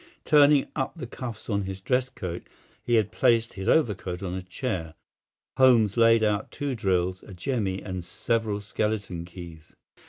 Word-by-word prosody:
Turning 145 -2 +6
up 135 - -2
the 160 - -6
cuffs 115 -2 -7
of 100 -2 0
his 95 0 -5
dress 125 +6 0
coat—he 95 +3 -5
had 110 -3 +2
placed 115 -1 +2
his 95 0 -3
overcoat 95 - +1
on 90 -2 -3
a 95 - -3
chair—Holmes 105 - 0
laid 115 -1 +5
out 105 -1 0
two 145 -2 -3
drills, 95 -4 0
a 100 - -12
jemmy, 100 -1 -2
and 95 -2 -5
several 110 +3 -1
skeleton 100 -4 -2
keys. 85 -3 -11
105 Hz, 150 wpm, -26 LUFS, 95-120 Hz, -, Turning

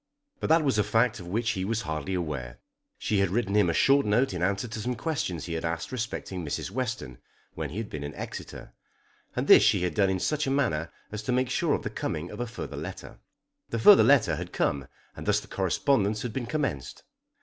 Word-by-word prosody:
But - - -2
that 160 +1 +4
was 135 -7 +2
a - - +4
fact 115 +1 +2
of 90 - -9
which 110 +5 0
he 95 -5 -2
was 115 +3 -1
hardly 80 +1 -3
aware. 70 -9 -4 0.4
She 105 - 0
had 100 -1 +2
written 100 0 0
him 105 -4 +4
a - - +1
short 140 +1 +5
note 110 +3 +2
in 90 - -4
answer 100 +5 0
to 115 0 -6
some 125 +3 -2
questions 110 - -2
he 85 - -4
had 80 - -3
asked 85 0 -3
respecting 110 -7 -4
Mrs. 80 +4 -3
Western 110 - -4 0.3
when 80 -2 -4
he 85 - -7
had 110 -1 -3
been 75 -5 -6
in 75 +1 -6
Exeter, - - -8 0.6
and - - -1
this - - +8
she - - +3
had 90 - 0
done 100 -2 +3
in 95 -1 0
such 150 +7 0
a - - +1
manner 110 - 0 0.2
as 105 0 -4
to 125 - -2
make 125 0 +1
sure - - +2
of - - -5
the - - -4
coming 80 +3 -4
of - - -8
a 120 - -2
further 115 - -7
letter. 90 +6 -7 0.5
The 115 - -2
further 195 - +8
letter 140 -5 +4
had - - -6
come 70 0 -1 0.3
and - - -8
thus - - +3
the - - -13
correspondence 105 -6 +1
had 120 -3 -4
been 120 -2 -3
commenced. 125 - -3
105 Hz, 230 wpm, -27 LUFS, 85-125 Hz, 0.6 s, this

